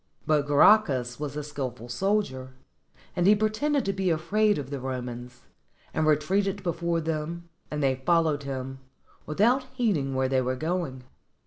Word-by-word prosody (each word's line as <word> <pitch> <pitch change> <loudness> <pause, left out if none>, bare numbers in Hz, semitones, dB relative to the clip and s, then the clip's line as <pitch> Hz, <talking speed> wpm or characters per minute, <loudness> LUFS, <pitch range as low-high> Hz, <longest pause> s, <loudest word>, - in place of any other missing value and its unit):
But 150 -2 +2
Gracchus 140 - +4
was 150 -1 -4
a 150 - -3
skillful 130 -5 -5
soldier, 130 - -1 0.6
and 175 +1 +2
he 210 - +7
pretended 230 +7 0
to 195 - 0
be 190 -1 0
afraid 205 +7 +2
of 140 -2 -5
the 140 - -3
Romans, 125 -1 -6 0.5
and 155 -1 +1
retreated 195 +6 +1
before 170 -1 -1
them, 165 +2 -4 0.2
and 150 -1 -2
they 130 -1 +1
followed 160 -2 +2
him, 135 -1 -5 0.5
without 240 - +2
heeding 170 - 0
where 130 0 +1
they 130 0 +2
were 130 +1 -1
going. 155 -3 -3
150 Hz, 150 wpm, -27 LUFS, 130-195 Hz, 0.6 s, he